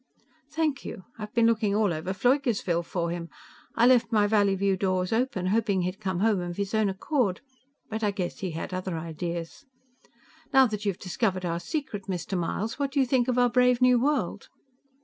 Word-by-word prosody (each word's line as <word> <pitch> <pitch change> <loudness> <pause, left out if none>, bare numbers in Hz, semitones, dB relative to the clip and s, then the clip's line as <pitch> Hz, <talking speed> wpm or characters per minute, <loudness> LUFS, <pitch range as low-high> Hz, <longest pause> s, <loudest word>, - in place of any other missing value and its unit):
"Thank 305 -2 -1
you. 185 - -7 0.2
I've 210 -1 -6
been 235 -1 +4
looking 220 -3 +2
all 210 -4 +2
over 160 +4 -3
Pfleugersville 215 - +1
for 170 -1 -2
him. 170 -1 -5 0.5
I 230 - +4
left 245 -2 +4
my 210 -2 +4
Valleyview 200 -2 +2
doors 185 0 0
open, 225 -5 0
hoping 205 -5 +1
he'd 185 +2 -3
come 190 -3 -2
home 215 -2 +3
of 175 -1 -5
his 200 +1 -3
own 220 -2 +2
accord, 195 - -1 0.5
but 220 +1 -4
I 210 - +3
guess 195 -3 -4
he 190 - -3
had 165 +3 -5
other 185 -2 -3
ideas. 170 - -5 0.9
Now 265 0 +7
that 210 -3 -3
you've 195 -3 0
discovered 185 -1 -1
our 170 0 -1
secret, 205 - -4
Mr. 185 0 -3
Myles, 195 +8 -2
what 280 -1 -1
do 285 - +1
you 265 - +4
think 250 -1 +1
of 250 -1 0
our 245 -1 +4
brave 250 0 +4
new 250 -1 +5
world?" 295 +3 -1
205 Hz, 190 wpm, -27 LUFS, 185-240 Hz, 0.9 s, Now